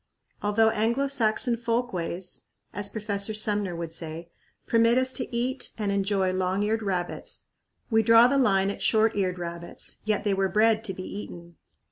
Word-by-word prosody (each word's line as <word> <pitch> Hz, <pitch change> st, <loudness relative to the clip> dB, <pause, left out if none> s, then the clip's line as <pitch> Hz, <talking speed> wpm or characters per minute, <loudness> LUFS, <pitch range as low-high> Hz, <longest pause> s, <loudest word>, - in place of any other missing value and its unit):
Although 220 Hz, +2 st, +3 dB
Anglo 230 Hz, +6 st, +1 dB
Saxon 240 Hz, -2 st, +2 dB
"folkways," 225 Hz, -7 st, -3 dB, 0.3 s
as 200 Hz, 0 st, -3 dB
Professor 210 Hz, 0 st, -2 dB
Sumner 205 Hz, -4 st, 0 dB
would 165 Hz, -1 st, -5 dB
say, 165 Hz, +1 st, -6 dB, 0.3 s
permit 230 Hz, +1 st, +3 dB
us 260 Hz, 0 st, +2 dB
to 255 Hz, -, -3 dB
eat 255 Hz, +3 st, -2 dB
and 210 Hz, -2 st, -1 dB
enjoy 195 Hz, -1 st, 0 dB
long 185 Hz, +2 st, 0 dB
eared 220 Hz, +2 st, 0 dB
rabbits, 185 Hz, -4 st, -4 dB, 0.5 s
we 225 Hz, 0 st, +4 dB
draw 230 Hz, +2 st, +7 dB
the 275 Hz, +3 st, +3 dB
line 195 Hz, -6 st, +3 dB
at -, -, -8 dB
short 220 Hz, 0 st, +3 dB
eared 185 Hz, -3 st, 0 dB
rabbits, 170 Hz, 0 st, -6 dB
yet 215 Hz, -1 st, 0 dB
they 205 Hz, -2 st, +1 dB
were 195 Hz, 0 st, +1 dB
bred 220 Hz, +1 st, +3 dB
to 190 Hz, -3 st, -2 dB
be 185 Hz, -, -6 dB
eaten. 175 Hz, -4 st, -8 dB
205 Hz, 165 wpm, -26 LUFS, 185-225 Hz, 0.5 s, draw